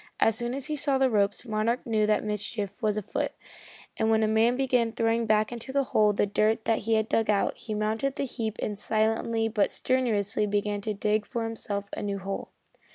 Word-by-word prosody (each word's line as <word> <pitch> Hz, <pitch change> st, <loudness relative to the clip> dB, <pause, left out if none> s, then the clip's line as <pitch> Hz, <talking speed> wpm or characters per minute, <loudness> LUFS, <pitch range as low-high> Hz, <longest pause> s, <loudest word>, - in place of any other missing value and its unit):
As 225 Hz, -, +4 dB
soon 240 Hz, +2 st, -2 dB
as 275 Hz, -1 st, -4 dB
he 305 Hz, -, -2 dB
saw 280 Hz, -1 st, +2 dB
the 265 Hz, -1 st, +2 dB
ropes, 205 Hz, +1 st, +1 dB
Monarch 225 Hz, +2 st, -1 dB
knew 215 Hz, -2 st, +1 dB
that 215 Hz, -, +2 dB
mischief 210 Hz, +1 st, -4 dB
was 215 Hz, -2 st, +1 dB
afoot, 210 Hz, -, -2 dB, 0.6 s
and 220 Hz, -, +1 dB
when 220 Hz, 0 st, +3 dB
a -, -, +3 dB
man 220 Hz, +3 st, +3 dB
began 250 Hz, -3 st, +1 dB
throwing 230 Hz, 0 st, 0 dB
back 215 Hz, +1 st, +2 dB
into 240 Hz, +2 st, -6 dB
the 275 Hz, +1 st, +2 dB
hole 210 Hz, -1 st, +5 dB
the 205 Hz, -, +1 dB
dirt 215 Hz, +2 st, +1 dB
that 225 Hz, -, +2 dB
he 225 Hz, +2 st, +1 dB
had 220 Hz, 0 st, +1 dB
dug 225 Hz, -1 st, +1 dB
out, 205 Hz, -1 st, +2 dB
he 215 Hz, -2 st, -5 dB
mounted 220 Hz, +6 st, -1 dB
the -, -, -2 dB
heap 225 Hz, -4 st, -3 dB
and 205 Hz, -1 st, -3 dB
silently 225 Hz, +1 st, +1 dB
but 215 Hz, -2 st, +1 dB
strenuously 215 Hz, -5 st, +1 dB
began 205 Hz, 0 st, -1 dB
to 215 Hz, 0 st, -3 dB
dig 210 Hz, +1 st, 0 dB
for 235 Hz, -, -3 dB
himself 205 Hz, -3 st, -4 dB
a -, -, -4 dB
new 200 Hz, -1 st, -2 dB
hole. 195 Hz, 0 st, -5 dB
220 Hz, 215 wpm, -27 LUFS, 210-230 Hz, 0.6 s, hole